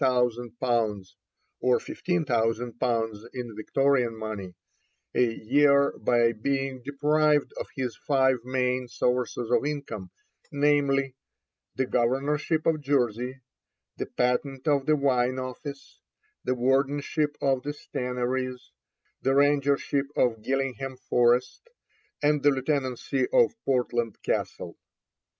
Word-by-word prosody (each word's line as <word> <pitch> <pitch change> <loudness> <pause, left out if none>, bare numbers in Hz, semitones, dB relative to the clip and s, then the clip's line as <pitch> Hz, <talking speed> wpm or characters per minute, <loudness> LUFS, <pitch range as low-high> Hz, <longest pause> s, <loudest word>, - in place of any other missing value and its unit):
_ 120 -4 0 0.5
(or 125 -1 +3
15,000_l._ 115 - -1
in 120 -3 -5
Victorian 125 +1 +1
money) 105 -5 -6 0.6
a 125 -2 +3
year 140 +5 +3
by 120 -1 +3
being 135 +3 -2
deprived 150 +2 +2
of - - -4
his 125 -4 -3
five 130 -2 +2
main 125 0 0
sources 120 0 -1
of 125 - +3
income, 140 -10 -4 0.4
namely 140 -2 +2 0.6
the 130 - +1
Governorship 140 +6 0
of 155 -2 +2
Jersey, 130 -2 0 0.6
the - - -3
Patent 130 +3 -1
of 145 -1 +2
the 155 - +5
Wine 130 -3 +1
Office, 140 +2 -7 0.4
the 130 - 0
Wardenship 140 +4 +1
of 135 -2 +1
the 145 - -5
Stannaries, 125 - -3 0.5
the 135 +1 +2
Rangership 140 0 +2
of 115 -3 +1
Gillingham 135 +1 -2
Forest, 125 - +1 0.5
and 150 0 +3
the 145 - +5
Lieutenancy 135 -1 -1
of 485 -2 +4
Portland 120 -4 0
Castle. - - -3
130 Hz, 105 wpm, -27 LUFS, 120-140 Hz, 0.6 s, the